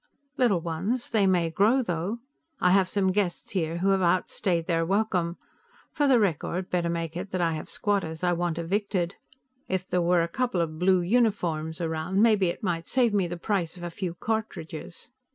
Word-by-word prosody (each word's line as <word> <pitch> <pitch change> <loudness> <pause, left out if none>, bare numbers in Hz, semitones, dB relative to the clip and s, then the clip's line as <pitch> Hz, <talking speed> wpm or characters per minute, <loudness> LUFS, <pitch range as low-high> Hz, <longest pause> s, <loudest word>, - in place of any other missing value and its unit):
"Little 230 - +2
ones; 190 +10 -2
they 210 -4 +3
may 175 -3 +2
grow, 220 +10 +3
though. 180 +3 -2 0.4
I 180 - +4
have 190 -1 +4
some 190 -2 +1
guests 190 -3 -1
here 165 -4 -1
who 190 +3 +1
have 195 -1 +3
outstayed 175 0 +1
their 165 -2 +1
welcome. 180 -2 0 0.5
For 290 - +1
the 260 -3 +5
record, 185 -1 -1
better 175 -1 0
make 165 -1 -3
it 185 +3 -5
that 185 - -2
I 165 -2 +1
have 155 - -6
squatters 190 -6 -1
I 175 -1 +3
want 175 -1 -1
evicted. 185 +1 -1 0.5
If 185 0 -2
there 180 - +1
were 175 0 +3
a - - -1
couple 240 +1 -1
of 160 -2 -2
blue 185 0 +4
uniforms 175 -7 0
around, 165 +3 -1
maybe 210 -4 +4
it 170 - -4
might 170 -3 -2
save 245 -4 +2
me 195 -3 +2
the 175 +1 -5
price 175 -2 -2
of 175 - -9
a 175 - -4
few 175 -1 -4
cartridges." 180 -3 -5
180 Hz, 190 wpm, -27 LUFS, 170-200 Hz, 0.5 s, the